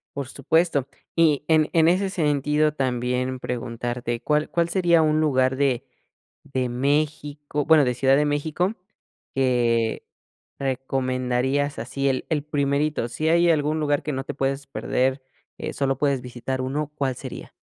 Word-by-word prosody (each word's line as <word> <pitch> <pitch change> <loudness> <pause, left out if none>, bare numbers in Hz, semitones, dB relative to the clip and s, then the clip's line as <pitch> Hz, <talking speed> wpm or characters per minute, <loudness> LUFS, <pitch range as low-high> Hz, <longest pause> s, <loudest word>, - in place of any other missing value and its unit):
Por 140 -2 -4
supuesto. 145 +1 +1 0.3
Y 155 -4 +3
en 155 -2 +3
en 165 -1 +5
ese 190 +3 +2
sentido 150 -3 +1
también 125 -1 -1
preguntarte, 120 0 -3
¿cuál 150 +3 +1
cuál 170 0 0
sería 170 -2 +3
un 155 0 +2
lugar 130 -4 +2
de 135 -3 +1 0.6
de 130 -2 -2
México, 145 +2 -1
bueno, 155 -1 +6
de 125 - +1
Ciudad 135 +2 +4
de 150 - +2
México, 155 +7 -1 0.6
que 120 -4 +1 0.5
recomendarías? 130 +1 -1
Así 135 +4 -1
el 130 -1 -1
el 150 -3 0
primerito. 145 -2 0
Si 155 +6 -2
hay 170 +1 +4
algún 155 0 +1
lugar 145 -1 0
que 150 - -3
no 135 0 -3
te - - -4
puedes 135 +1 -2
perder, 130 0 -1 0.4
eh, - - -4
solo 135 -2 0
puedes 140 -2 +1
visitar 125 +1 -4
uno, 145 +3 -2
¿cuál 135 -3 -1
sería? - - -8
140 Hz, 150 wpm, -24 LUFS, 130-150 Hz, 0.6 s, bueno